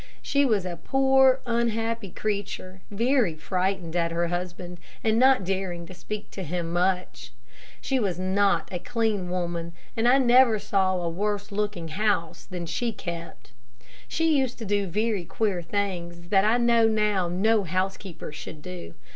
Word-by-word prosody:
She 280 Hz, 0 st, +2 dB
was 210 Hz, -7 st, +1 dB
a 175 Hz, -2 st, -4 dB
poor, 265 Hz, -1 st, +4 dB
unhappy 230 Hz, -2 st, -1 dB
creature, 190 Hz, -2 st, -4 dB
very 230 Hz, -, +2 dB
frightened 180 Hz, 0 st, -2 dB
at 170 Hz, -1 st, +2 dB
her 170 Hz, 0 st, 0 dB
husband, 175 Hz, 0 st, -5 dB, 0.2 s
and 220 Hz, 0 st, +3 dB
not 260 Hz, -4 st, +5 dB
daring 185 Hz, -2 st, -2 dB
to 185 Hz, -, -10 dB
speak 210 Hz, +3 st, -6 dB
much -, -, -30 dB
to -, -, -3 dB
him. 170 Hz, +1 st, -2 dB, 1.0 s
She 265 Hz, -1 st, 0 dB
was 195 Hz, -6 st, -1 dB
not 185 Hz, -2 st, +2 dB
a 180 Hz, -, -2 dB
clean 220 Hz, -4 st, -1 dB
woman, 170 Hz, -2 st, -3 dB, 0.2 s
and 225 Hz, +1 st, +2 dB
I 255 Hz, +2 st, +6 dB
never 250 Hz, -3 st, +5 dB
saw 195 Hz, -2 st, +1 dB
a 175 Hz, -2 st, -2 dB
worse 205 Hz, +4 st, -2 dB
looking 200 Hz, -5 st, -2 dB
house 195 Hz, -1 st, -1 dB
than 180 Hz, -2 st, -5 dB
she 230 Hz, +9 st, -1 dB
kept. 170 Hz, -, -7 dB, 0.6 s
She 325 Hz, -1 st, +2 dB
used 265 Hz, -3 st, 0 dB
to 225 Hz, -, -6 dB
do 205 Hz, -1 st, 0 dB
very 210 Hz, +1 st, 0 dB
queer 190 Hz, +1 st, -1 dB
things, 170 Hz, -2 st, -3 dB
that 195 Hz, 0 st, +4 dB
I 220 Hz, +3 st, +4 dB
know 235 Hz, -1 st, +4 dB
now 210 Hz, -4 st, +1 dB
no 205 Hz, +5 st, +2 dB
housekeeper 185 Hz, -1 st, -3 dB
should 150 Hz, 0 st, -9 dB
do. 180 Hz, -, -8 dB
195 Hz, 160 wpm, -26 LUFS, 175-225 Hz, 1.0 s, I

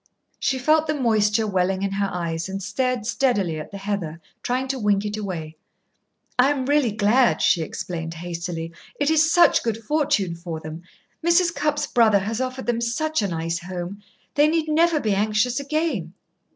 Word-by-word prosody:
She 265 Hz, -, 0 dB
felt 310 Hz, +4 st, +3 dB
the 305 Hz, -, 0 dB
moisture 220 Hz, -4 st, +2 dB
welling 190 Hz, -1 st, 0 dB
in 195 Hz, -, -1 dB
her 200 Hz, 0 st, -1 dB
eyes, 170 Hz, 0 st, -3 dB
and 195 Hz, 0 st, -4 dB
stared 250 Hz, +3 st, -1 dB
steadily 205 Hz, -, 0 dB
at 155 Hz, -, -7 dB
the 200 Hz, -, -8 dB
heather, 195 Hz, -5 st, -4 dB, 0.2 s
trying 255 Hz, +2 st, -1 dB
to 265 Hz, -1 st, -2 dB
wink 205 Hz, -2 st, +1 dB
it 210 Hz, 0 st, -2 dB
away. 170 Hz, -7 st, -5 dB, 0.8 s
"I 260 Hz, +2 st, +6 dB
am 275 Hz, -3 st, -1 dB
really 285 Hz, -4 st, +2 dB
glad," 215 Hz, +4 st, +3 dB
she 170 Hz, -, +3 dB
explained 165 Hz, +1 st, -5 dB
hastily. 170 Hz, -1 st, -5 dB, 0.3 s
"It 290 Hz, +1 st, +2 dB
is 320 Hz, 0 st, +4 dB
such 340 Hz, -2 st, +5 dB
good 230 Hz, -2 st, -1 dB
fortune 220 Hz, -, +1 dB
for 170 Hz, -1 st, -6 dB
them. 155 Hz, +1 st, -8 dB, 0.4 s
Mrs. 340 Hz, 0 st, +3 dB
Cupp's 300 Hz, -2 st, 0 dB
brother 225 Hz, -4 st, +4 dB
has 215 Hz, +5 st, -2 dB
offered 260 Hz, 0 st, -4 dB
them 235 Hz, -1 st, 0 dB
such 310 Hz, +5 st, 0 dB
a 200 Hz, -, 0 dB
nice 165 Hz, -1 st, -2 dB
home. 180 Hz, +2 st, -6 dB, 0.3 s
They 295 Hz, +1 st, +4 dB
need 320 Hz, 0 st, +1 dB
never 320 Hz, +1 st, +3 dB
be 215 Hz, -6 st, 0 dB
anxious 215 Hz, +5 st, +1 dB
again." 280 Hz, -, -2 dB
215 Hz, 180 wpm, -23 LUFS, 180-270 Hz, 0.8 s, I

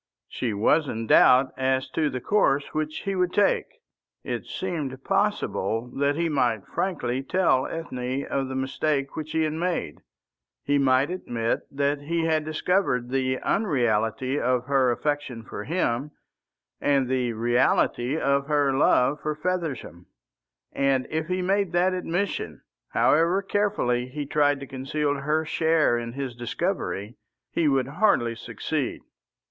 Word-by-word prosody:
She 120 Hz, -, -3 dB
was 140 Hz, +9 st, +2 dB
in 115 Hz, -2 st, -3 dB
doubt 130 Hz, +4 st, +5 dB
as 130 Hz, 0 st, +1 dB
to 155 Hz, -2 st, +1 dB
the 130 Hz, -, -4 dB
course 140 Hz, -, +1 dB
which 155 Hz, 0 st, -2 dB
he 195 Hz, -, -1 dB
would 180 Hz, -1 st, +1 dB
take. 205 Hz, +1 st, +2 dB, 0.6 s
It -, -, -4 dB
seemed 145 Hz, -8 st, -4 dB
possible 115 Hz, +2 st, 0 dB
that 140 Hz, +1 st, +1 dB
he 170 Hz, +2 st, 0 dB
might 120 Hz, -9 st, 0 dB
frankly 135 Hz, -9 st, -2 dB
tell 140 Hz, -3 st, +2 dB
Ethne 130 Hz, -4 st, -4 dB
of 135 Hz, -1 st, -2 dB
the 130 Hz, -, -5 dB
mistake 135 Hz, +1 st, -1 dB
which 155 Hz, -1 st, -5 dB
he 160 Hz, -, +2 dB
had 155 Hz, -1 st, -1 dB
made. 165 Hz, -, -2 dB, 0.6 s
He 145 Hz, 0 st, +2 dB
might 135 Hz, +3 st, +3 dB
admit 115 Hz, -10 st, -2 dB
that 140 Hz, +1 st, -1 dB
he 165 Hz, +3 st, -1 dB
had 160 Hz, -1 st, +1 dB
discovered 155 Hz, -6 st, 0 dB
the 130 Hz, -1 st, 0 dB
unreality 130 Hz, -, 0 dB
of 125 Hz, 0 st, +1 dB
her 135 Hz, -2 st, +3 dB
affection 130 Hz, -2 st, -2 dB
for 105 Hz, -, -7 dB
him, 145 Hz, -3 st, -1 dB, 0.7 s
and 140 Hz, -3 st, +2 dB
the 125 Hz, -2 st, 0 dB
reality 120 Hz, +3 st, +1 dB
of 140 Hz, -2 st, +1 dB
her 145 Hz, -2 st, +2 dB
love 135 Hz, +1 st, +3 dB
for 155 Hz, 0 st, -2 dB
Feversham; 150 Hz, -, -4 dB, 0.7 s
and 135 Hz, -2 st, +1 dB
if 155 Hz, 0 st, -2 dB
he 185 Hz, +1 st, -1 dB
made 195 Hz, -1 st, +1 dB
that 180 Hz, +2 st, +3 dB
admission, 175 Hz, -, -2 dB, 0.3 s
however 170 Hz, +6 st, +3 dB
carefully 195 Hz, -13 st, 0 dB
he 145 Hz, +3 st, -5 dB
tried 145 Hz, 0 st, +2 dB
to -, -, -5 dB
conceal 140 Hz, +3 st, -2 dB
her 150 Hz, +3 st, -1 dB
share 160 Hz, -4 st, +2 dB
in 115 Hz, 0 st, -6 dB
his 135 Hz, -2 st, -4 dB
discovery, 120 Hz, -, -3 dB, 0.3 s
he 165 Hz, -, +1 dB
would 135 Hz, -3 st, +2 dB
hardly 135 Hz, -, +2 dB
succeed. 115 Hz, -, -4 dB
140 Hz, 145 wpm, -25 LUFS, 125-160 Hz, 0.7 s, doubt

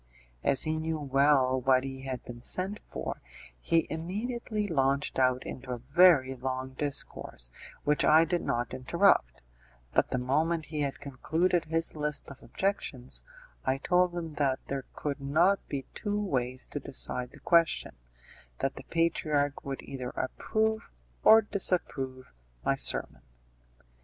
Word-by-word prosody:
As 135 Hz, -, +4 dB
he 155 Hz, 0 st, 0 dB
knew 160 Hz, 0 st, -2 dB
well 135 Hz, -2 st, +3 dB
what 130 Hz, 0 st, +3 dB
he 135 Hz, -1 st, -6 dB
had 130 Hz, -2 st, -5 dB
been 120 Hz, -1 st, -9 dB
sent 190 Hz, -, -2 dB
for, -, -, -5 dB, 0.4 s
he 165 Hz, -, +2 dB
immediately 210 Hz, +6 st, -3 dB
launched 140 Hz, -4 st, 0 dB
out 130 Hz, 0 st, +2 dB
into 130 Hz, 0 st, -8 dB
a -, -, -3 dB
very 140 Hz, +1 st, +5 dB
long 130 Hz, +1 st, -4 dB
discourse, 130 Hz, -, -4 dB, 0.3 s
which 150 Hz, 0 st, +2 dB
I 160 Hz, +2 st, +6 dB
did 175 Hz, +1 st, -1 dB
not 120 Hz, 0 st, -2 dB
interrupt, 65 Hz, -, +2 dB, 0.5 s
but -, -, +2 dB
the -, -, -1 dB
moment 155 Hz, +6 st, 0 dB
he 150 Hz, -, -1 dB
had 140 Hz, -1 st, -2 dB
concluded 165 Hz, +6 st, 0 dB
his 165 Hz, +1 st, +1 dB
list 150 Hz, -2 st, -1 dB
of 140 Hz, -, -12 dB
objections 135 Hz, -6 st, -3 dB, 0.4 s
I 130 Hz, +1 st, +1 dB
told 180 Hz, +4 st, +2 dB
him 165 Hz, -3 st, -4 dB
that 135 Hz, -2 st, +2 dB
there 135 Hz, -1 st, -4 dB
could 145 Hz, -1 st, -3 dB
not 170 Hz, +8 st, +3 dB
be 135 Hz, -2 st, -4 dB
two 205 Hz, -1 st, -2 dB
ways 130 Hz, -9 st, -1 dB
to 145 Hz, -, -4 dB
decide 125 Hz, -2 st, +2 dB
the -, -, -16 dB
question; 170 Hz, -2 st, +2 dB, 0.7 s
that 135 Hz, -, -2 dB
the 135 Hz, -, -7 dB
patriarch 155 Hz, -4 st, 0 dB
would 135 Hz, -1 st, -5 dB
either 130 Hz, -2 st, -5 dB
approve 220 Hz, -, -1 dB, 0.3 s
or 220 Hz, 0 st, +8 dB
disapprove 135 Hz, -10 st, -1 dB, 0.3 s
my -, -, +3 dB
sermon. -, -, +1 dB
140 Hz, 145 wpm, -29 LUFS, 130-170 Hz, 0.7 s, or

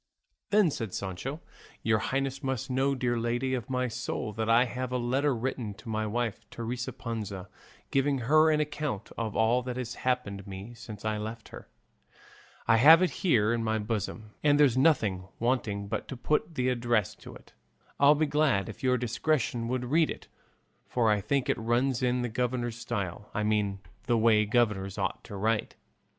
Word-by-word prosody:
Then 205 Hz, -6 st, +4 dB
said 110 Hz, -8 st, -4 dB
Sancho, 100 Hz, -, -4 dB, 0.4 s
"Your 110 Hz, -1 st, +3 dB
highness 135 Hz, +5 st, -2 dB
must 130 Hz, -1 st, -3 dB
know, 135 Hz, +2 st, +1 dB
dear 120 Hz, -2 st, 0 dB
lady 120 Hz, +3 st, -1 dB
of 120 Hz, -5 st, -3 dB
my 125 Hz, -1 st, 0 dB
soul, 110 Hz, -2 st, -4 dB
that 110 Hz, +1 st, -2 dB
I 120 Hz, +2 st, +5 dB
have 125 Hz, +1 st, -4 dB
a 125 Hz, -, 0 dB
letter 130 Hz, +3 st, +1 dB
written 115 Hz, -3 st, -3 dB
to 115 Hz, -, -11 dB
my 110 Hz, 0 st, -1 dB
wife, 115 Hz, 0 st, -3 dB
Teresa 120 Hz, +1 st, -4 dB
Panza, 105 Hz, -5 st, -5 dB, 0.4 s
giving 135 Hz, 0 st, +2 dB
her 155 Hz, +6 st, +5 dB
an 155 Hz, -1 st, +3 dB
account 150 Hz, -8 st, -3 dB
of 110 Hz, -2 st, -3 dB
all 115 Hz, +3 st, +3 dB
that 125 Hz, 0 st, -5 dB
has 120 Hz, -2 st, -4 dB
happened 105 Hz, -6 st, -1 dB
me 100 Hz, +4 st, -8 dB
since 110 Hz, -3 st, -10 dB
I 110 Hz, -1 st, 0 dB
left 110 Hz, +1 st, -6 dB
her; -, -, -11 dB, 1.0 s
I 115 Hz, -, +5 dB
have 160 Hz, +9 st, +8 dB
it 180 Hz, -, +1 dB
here 115 Hz, -, +3 dB
in 115 Hz, -1 st, -1 dB
my 110 Hz, 0 st, 0 dB
bosom, 110 Hz, 0 st, -4 dB
and 145 Hz, -1 st, +4 dB
there's 140 Hz, -5 st, +5 dB
nothing 110 Hz, -, +2 dB
wanting 110 Hz, -5 st, -1 dB
but 110 Hz, +2 st, -3 dB
to 130 Hz, -, -6 dB
put 150 Hz, +5 st, 0 dB
the 130 Hz, -1 st, +1 dB
address 120 Hz, -5 st, +1 dB
to -, -, -11 dB
it; -, -, -16 dB, 0.5 s
I'd 145 Hz, +1 st, +6 dB
be 155 Hz, -, +2 dB
glad 145 Hz, -11 st, +1 dB
if -, -, -9 dB
your 125 Hz, -1 st, +2 dB
discretion 120 Hz, 0 st, 0 dB
would 125 Hz, 0 st, -1 dB
read 155 Hz, +5 st, +3 dB
it, -, -, -7 dB, 0.6 s
for 115 Hz, -3 st, +2 dB
I 105 Hz, -1 st, +2 dB
think 135 Hz, +6 st, 0 dB
it -, -, 0 dB
runs 120 Hz, +3 st, +1 dB
in 125 Hz, 0 st, +1 dB
the -, -, 0 dB
governor 120 Hz, +1 st, -1 dB
style; 105 Hz, -4 st, -5 dB
I 105 Hz, -, 0 dB
mean 105 Hz, -2 st, 0 dB, 0.3 s
the 120 Hz, -1 st, +3 dB
way 110 Hz, -1 st, +4 dB
governors 105 Hz, -4 st, +1 dB
ought 95 Hz, -1 st, -2 dB
to 100 Hz, -, -8 dB
write." 110 Hz, +2 st, 0 dB
120 Hz, 185 wpm, -29 LUFS, 110-130 Hz, 1.0 s, have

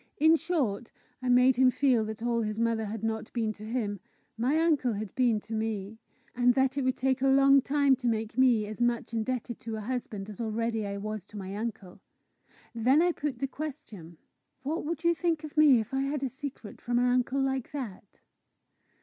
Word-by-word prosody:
In 320 Hz, -1 st, +6 dB
short, 275 Hz, -, -1 dB, 0.3 s
I 255 Hz, -, -2 dB
made 250 Hz, 0 st, +5 dB
him 260 Hz, 0 st, +6 dB
feel 255 Hz, -3 st, +2 dB
that 220 Hz, +1 st, -6 dB
all 235 Hz, -1 st, +1 dB
his 215 Hz, 0 st, -3 dB
mother 230 Hz, -1 st, +1 dB
had 215 Hz, +1 st, -6 dB
not 220 Hz, -1 st, -3 dB
been 225 Hz, -3 st, -1 dB
to 210 Hz, -, -13 dB
him, 215 Hz, -3 st, -3 dB, 0.4 s
my 250 Hz, +7 st, +1 dB
uncle 300 Hz, -7 st, +2 dB
had 210 Hz, -1 st, -5 dB
been 240 Hz, -4 st, +2 dB
to 225 Hz, -, -9 dB
me; 220 Hz, -1 st, -3 dB, 0.4 s
and 245 Hz, 0 st, +3 dB
that 265 Hz, 0 st, +2 dB
it 280 Hz, -, -1 dB
would 255 Hz, 0 st, +1 dB
take 260 Hz, 0 st, 0 dB
a 270 Hz, -, +3 dB
long 275 Hz, 0 st, +6 dB
time 280 Hz, 0 st, +3 dB
to 245 Hz, -, -3 dB
make 220 Hz, -1 st, -1 dB
me 245 Hz, -4 st, +4 dB
as 215 Hz, +3 st, -7 dB
much 240 Hz, -1 st, 0 dB
indebted 235 Hz, +1 st, -3 dB
to 225 Hz, -1 st, -5 dB
a 215 Hz, -, -5 dB
husband 215 Hz, -4 st, -4 dB
as 215 Hz, +2 st, -8 dB
already 225 Hz, -1 st, -1 dB
I 200 Hz, 0 st, -4 dB
was 215 Hz, -1 st, -5 dB
to 210 Hz, -, -11 dB
my 195 Hz, 0 st, -6 dB
uncle. 210 Hz, -4 st, -6 dB, 0.7 s
Then 250 Hz, +5 st, +3 dB
I 350 Hz, +1 st, +4 dB
put 290 Hz, -6 st, -4 dB
the 275 Hz, -, -2 dB
question: 260 Hz, -, -8 dB, 0.5 s
"What 315 Hz, +6 st, -2 dB
would 330 Hz, +1 st, -4 dB
you 340 Hz, 0 st, +4 dB
think 330 Hz, -2 st, -1 dB
of 305 Hz, 0 st, -8 dB
me 300 Hz, -5 st, +6 dB
if 220 Hz, +3 st, -5 dB
I 270 Hz, -, +1 dB
had 280 Hz, 0 st, -2 dB
a 265 Hz, -, 0 dB
secret 265 Hz, -4 st, -8 dB
from 240 Hz, 0 st, -1 dB
an 245 Hz, -, +3 dB
uncle 250 Hz, +2 st, +1 dB
like 265 Hz, -2 st, -1 dB
that?" 225 Hz, -9 st, -8 dB
240 Hz, 210 wpm, -29 LUFS, 220-270 Hz, 0.7 s, In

